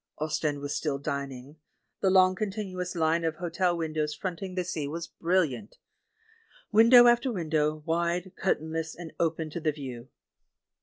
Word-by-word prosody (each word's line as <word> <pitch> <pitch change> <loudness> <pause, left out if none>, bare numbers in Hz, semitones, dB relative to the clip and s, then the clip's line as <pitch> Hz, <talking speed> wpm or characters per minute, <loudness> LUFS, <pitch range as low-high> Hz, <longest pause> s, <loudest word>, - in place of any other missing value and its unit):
Ostend 155 -1 -1
was 145 0 -3
still 145 -3 -1
dining. 140 0 -5 0.4
The 195 - +2
long 185 0 +5
continuous 190 -3 -4
line 165 0 +1
of 160 -1 -1
hotel 175 +1 0
windows 155 -2 -2
fronting 185 0 -5
the 180 - 0
sea 160 -5 -3
was 165 +3 -4 0.2
brilhant. 175 - 0 1.0
Window 230 +3 +8
after 240 +2 +4
window, 155 -5 -1
wide, 170 +2 -1
curtainless, 160 -3 -2
and 170 -2 -9
open 160 -1 -1
to 170 - -4
the 155 -1 +1
view. 130 -4 -8
165 Hz, 145 wpm, -28 LUFS, 155-185 Hz, 1.0 s, Window